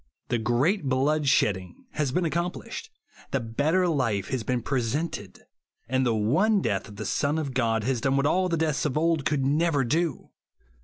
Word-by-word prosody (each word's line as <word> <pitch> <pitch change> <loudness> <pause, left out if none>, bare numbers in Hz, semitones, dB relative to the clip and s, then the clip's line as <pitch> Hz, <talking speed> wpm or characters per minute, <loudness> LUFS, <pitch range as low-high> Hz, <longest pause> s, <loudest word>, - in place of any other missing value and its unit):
The 120 - +1
great 135 - +1
blood 140 +3 +1
shedding 95 -8 0
has 150 -4 -1
been 175 +6 0
ac 160 - -1
complished; 175 - -4 0.4
the 135 - 0
better 145 +11 +1
life 115 - 0
has 130 -2 -1
been 120 +1 -2
pre 135 0 0
sented; 115 - -3 0.5
and 130 +2 +1
the 115 - +2
one 160 - +3
death 100 - -1
of 105 - -12
the - - -6
Son 145 +1 0
of 145 -4 -3
God 115 -3 +1
has 130 -1 0
done 135 +2 +1
what 140 - +2
all 185 +5 +2
the 170 - 0
deaths 155 -2 0
of 150 -1 0
old 160 -2 +1
could 150 -3 +1
never 150 0 +2
do. 160 +6 -1
140 Hz, 195 wpm, -26 LUFS, 120-160 Hz, 0.5 s, one